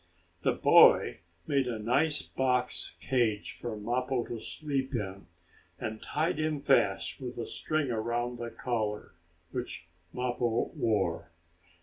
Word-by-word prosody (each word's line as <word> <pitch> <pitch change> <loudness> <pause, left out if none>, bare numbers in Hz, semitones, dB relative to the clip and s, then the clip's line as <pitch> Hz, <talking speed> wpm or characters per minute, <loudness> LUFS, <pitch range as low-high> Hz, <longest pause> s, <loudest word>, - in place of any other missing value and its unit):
The - - +2
boy - - +6 0.3
made 140 -4 +1
a 120 -2 -2
nice 140 +8 +4
box 125 -1 0
cage 115 -6 0
for 115 -3 -6
Mappo 125 +3 -1
to 115 - -6
sleep 140 0 -3
in, 100 -5 -5 0.5
and 110 0 -5
tied 155 +1 -1
him 155 -1 0
fast 135 -6 +2
with 125 -1 -6
a 115 - -3
string 155 0 -1
around 120 +2 -2
the 120 0 -4
collar, 110 -4 -3 0.4
which - - -5 0.3
Mappo 120 -2 -1
wore. 95 -6 0
120 Hz, 125 wpm, -30 LUFS, 110-135 Hz, 0.5 s, boy